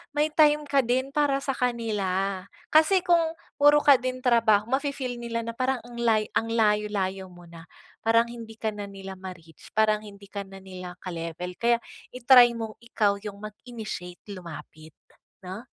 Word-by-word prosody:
may 300 +1 +1
time 300 -1 +4
ka 280 -1 +1
din 260 +2 0
para 280 -1 +1
sa 275 - 0
kanila. 200 -6 -1 0.2
Kasi 345 +4 +5
kung 335 -2 +2 0.2
puro 290 +1 +6
ka 280 -3 +7
din 255 0 -4
trabaho, 230 -4 +4 0.2
mafi-feel 270 -4 -4
nila 230 -1 -3
na 230 - -4
parang 255 +1 -1
ang 240 0 -10
lay 225 -2 +3
ang 225 - 0
layo-layo 210 -4 0
mo 175 0 -15
na, 165 -1 -12 0.4
parang 230 +1 +4
hindi 230 -2 -9
ka 220 - -1
na 205 -1 -6
nila 195 -1 -8
ma-reach, 170 -4 -11
parang 215 -1 +3
hindi 200 0 -13
ka 200 -1 -4
na 195 0 -11
nila 185 -1 -8
ka-level 170 0 -5
kaya, 235 0 +3 0.3
i-try 250 -1 +7
mong 225 -1 -5
ikaw 210 -4 +1
yung 200 -2 -7
mag-initiate 215 -4 -8 0.2
lumapit, 160 -3 -10 0.5
'no? 190 +5 -7
225 Hz, 165 wpm, -26 LUFS, 195-255 Hz, 0.5 s, ka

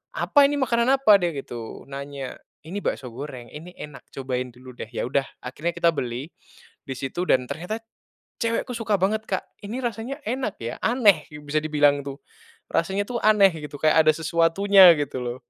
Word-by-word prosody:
"Apa 285 -2 +4
ini? 290 - -1
Makanan 235 -4 +1
apa?" 215 -7 +6
Dia 175 -3 -1
gitu 120 -4 -7
nanya. 140 -1 -7 0.2
"Ini 175 +6 -5
bakso 130 -10 -3
goreng, 125 -2 -8
ini 170 +4 -10
enak 150 -2 -10
cobain 125 -2 -4
dulu 130 +1 -12
deh." 120 - -8
Ya - - -4
udah, 135 +2 0 0.2
akhirnya 150 +7 -4
kita 170 - +3
beli 130 +1 -4 0.6
di 135 - -4
situ 135 +7 -3
dan 130 - +3
ternyata 180 - -4 0.6
cewekku 230 +2 -1
suka 215 -4 0
banget, 215 +3 +1
Kak, 190 -3 -4
"Ini 225 +6 -4
rasanya 240 +3 -4
enak 255 -3 -3
ya, 115 - -4
aneh." 210 - +4
Ya 150 - -9
bisa 145 +1 -5
dibilang 145 -2 +2
itu. 140 +1 -7 0.5
Rasanya 190 +4 0
tuh 245 - -3
aneh 210 -2 +6 0.2
gitu 145 0 -7
kayak 155 0 +4
ada 155 - +7
sesuatunya 170 +4 +5
gitu 140 -2 -3
loh, 120 0 -3
160 Hz, 180 wpm, -24 LUFS, 135-210 Hz, 0.6 s, ada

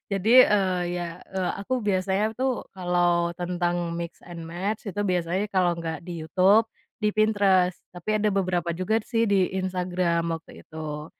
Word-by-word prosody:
Jadi, 200 +2 0
eee, 190 -3 +2 0.2
ya, 175 - -3 0.2
eee, 190 -1 -3
aku 255 +4 -1
biasanya 195 +3 +1
tuh 260 0 -1
kalau 175 -2 +1
tentang 175 -1 -1
mix 170 0 -5
and 170 -1 -8
match 195 +6 -4
itu 205 - -4
biasanya 180 +2 0
kalau 180 -2 +3
nggak 160 -2 -4
di 170 -2 -6
YouTube, 195 +7 +4 0.3
di 210 -1 0
Pinterest. 200 -4 +3 0.2
Tapi 180 +4 -5
ada 210 -1 +1
beberapa 180 -3 0
juga 185 +6 0
sih 230 -2 +1
di 195 -4 +2
Instagram 180 -3 -1
waktu 165 - -11
itu. 155 -1 -6
185 Hz, 155 wpm, -25 LUFS, 175-200 Hz, 0.3 s, YouTube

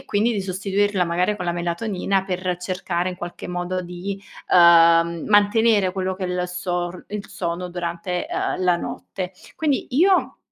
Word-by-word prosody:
e - - -15
quindi 215 +3 +1
di 205 - -1
sostituirla 195 +1 0
magari 180 +4 +1
con 180 -3 -5
la 175 - 0
melatonina, 185 +2 -1
per 185 -1 -2
cercare 180 -1 -2
in 180 - -5
qualche 175 0 -7
modo 180 +1 -2
di, 185 +3 -6 0.3
uhm, 170 -1 +6
mantenere 205 -1 +4
quello 190 +1 -4
che 185 0 -5
è - - -1
il 180 0 -1
sor 180 0 -3
il 210 0 -5
sonno 175 0 -4
durante, 175 - -3
uhm, 375 - -1
la 180 -1 +3
notte. 185 +1 -6 0.2
Quindi 295 -4 0
io, 360 +8 +3
185 Hz, 165 wpm, -22 LUFS, 175-200 Hz, 0.3 s, uhm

